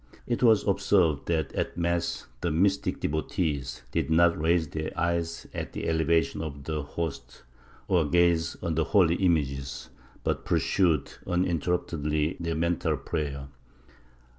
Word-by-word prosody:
It 120 - -1
was 110 -4 +5
observed 90 -6 +2
that 80 -2 0
at - - -2
mass 85 0 -1 0.2
the 85 - 0
mystic 95 +5 +1
devotees 80 -2 -2
did - - -1
not 85 +1 +5
raise 80 +1 +2
their 80 0 -4
eyes 85 -1 -1
at - - -5
the - - -4
elevation 80 0 +1
of 70 -3 -6
the 75 +1 -2
Host 75 -4 -6 0.4
or 85 -4 +3
gaze 85 -1 +2
on 85 - 0
the 80 +1 +1
holy 90 -3 +4
images, 70 -7 -1 0.3
but - - -1
pursued 85 -7 +1
uninterruptedly 85 -3 0
their 85 -1 -2
mental 85 +1 0
prayer. 70 -4 -4
80 Hz, 135 wpm, -27 LUFS, 75-85 Hz, 0.4 s, was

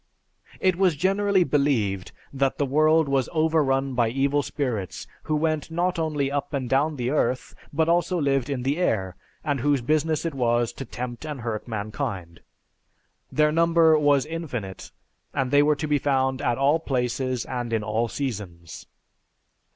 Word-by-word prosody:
"It 185 -2 +2
was 185 -4 +3
generally 195 +3 +2
believed 130 - 0 0.2
that 135 -1 0
the 145 - +1
world 155 +3 +3
was 135 -2 +1
overrun 150 -5 +1
by 120 -2 +2
evil 140 +4 +1
spirits 120 -10 -3 0.2
who 155 - 0
went 155 0 0
not 175 +2 -1
only 150 -4 -1
up 145 +1 -3
and 130 -2 -2
down 145 +5 +1
the 125 -1 -2
earth, 130 -4 0 0.2
but 160 +2 +1
also 175 +1 +2
lived 135 -3 +1
in 130 -3 -2
the 140 +4 0
air, 95 - 0 0.3
and 145 -2 -1
whose 145 +2 +2
business 155 +5 0
it 165 - -2
was 120 -2 +1
to 135 - -7
tempt 120 +1 -6
and 150 -4 -5
hurt 115 -1 -4
mankind. 100 -5 -4 0.9
Their 150 0 +3
number 165 0 +4
was 145 -2 +3
infinite, 135 - -6 0.5
and 130 -1 0
they 145 0 +6
were 150 +1 +3
to 155 +2 -4
be 145 -1 +2
found 130 -1 0
at 120 - 0
all 140 +4 +3
places 130 -3 -1
and 120 -2 -4
in 110 -2 0
all 110 +2 0
seasons. 100 - -6
140 Hz, 165 wpm, -25 LUFS, 120-155 Hz, 0.9 s, they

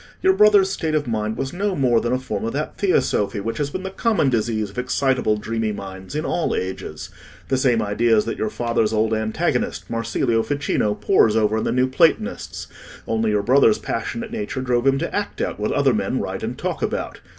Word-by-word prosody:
Your 380 0 +5
brother's 205 - +5
state 160 -4 -1
of 150 - 0
mind 110 -2 -2
was 135 +3 -3
no 195 +1 -1
more 125 -6 +3
than 120 - -1
a 125 - +2
form 125 -6 -4
of 115 - -2
that 150 +2 -3
theosophy 105 - +1
which 115 +6 -4
has 145 -1 0
been 185 +5 -5
the 190 - -4
common 195 - +1
disease 110 -3 -1
of 105 - -5
excitable 125 -3 +1
dreamy 110 0 -2
minds 95 +2 -8
in 155 +1 -2
all 175 - 0
ages; 95 +1 -5 0.4
the 135 - +2
same 125 -4 +2
ideas 110 +1 +2
that 115 - -4
your 110 - 0
father's 115 -1 0
old 110 +1 +1
antagonist, 110 0 -1
Marsilio 115 +1 0
Ficino, 110 -4 0
pores 105 +1 +3
over 110 0 +2
in - - -2
the - - 0
New 125 +1 +3
Platonists; 130 0 +1 0.4
only 110 -1 0
your 105 -1 +1
brother's 125 -1 +5
passionate 225 - -4
nature 210 - -4
drove 125 0 +1
him 135 0 +4
to - - -3
act - - -3
out - - -2
what - - -1
other - - +3
men - - -1
write - - -4
and - - -4
talk - - -3
about. - - -3
115 Hz, 205 wpm, -22 LUFS, 110-140 Hz, 0.4 s, Your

